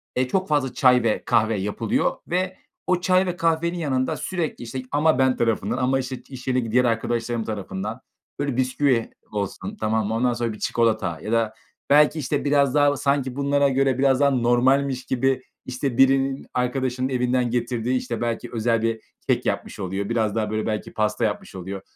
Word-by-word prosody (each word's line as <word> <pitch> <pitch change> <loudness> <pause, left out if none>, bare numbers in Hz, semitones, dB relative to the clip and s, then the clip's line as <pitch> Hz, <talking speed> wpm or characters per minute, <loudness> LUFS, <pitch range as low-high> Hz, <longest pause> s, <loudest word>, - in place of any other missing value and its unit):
e, 130 0 +1
çok 190 +7 0
fazla 145 -4 0
çay 125 -2 +4
ve 110 -2 0
kahve 110 -2 +2
yapılıyor 100 +2 0
ve 185 +1 -1 0.3
o 180 -1 +2
çay 185 0 +3
ve 180 -1 -2
kahvenin 165 +1 +1
yanında 130 -5 -1
sürekli, 170 -9 -3
işte, 130 +2 -5
ama 150 -1 +3
ben 130 -1 +3
tarafından 115 -1 0
ama, 130 +1 +1
işte, 130 0 -4
iş 130 -1 -10
yeri 125 -4 0
diğer 125 +1 +4
arkadaşlarım 115 0 -1
tarafından 105 +2 -5 0.4
böyle 140 -3 -1
bisküvi 130 -2 +1 0.2
olsun, 105 - -4
tamam 110 -1 0
mı, 110 - -2
ondan 120 +1 +2
sonra 120 -2 -2
bir 105 - -11
çikolata 110 -7 0
ya 105 - -5
da 115 -2 +1 0.4
belki, 150 +2 +5
işte, 145 +1 -2
biraz 140 -2 +3
daha 145 -1 +4
sanki 140 -2 0
bunlara 140 0 +2
göre 135 -1 +1
biraz 135 -1 +3
daha 140 -1 +5
normalmiş 130 +2 +2
gibi, 130 0 +1 0.2
işte, 130 0 -3
birinin 135 0 +3
arkadaşının 130 +1 -1
evinden 125 -1 +1
getirdiği, 120 +1 0
işte, 120 -2 -4
belki 115 -1 -2
özel 115 0 +1
bir 115 -1 -1 0.3
kek - - +2
yapmış - - -3
oluyor. 95 +2 -3
Biraz 110 -3 0
daha, 110 -2 0
böyle, 110 0 -1
belki 105 -1 -3
pasta 105 +1 0
yapmış 105 -2 -4
oluyor. 95 +1 -6
125 Hz, 180 wpm, -23 LUFS, 115-140 Hz, 0.4 s, belki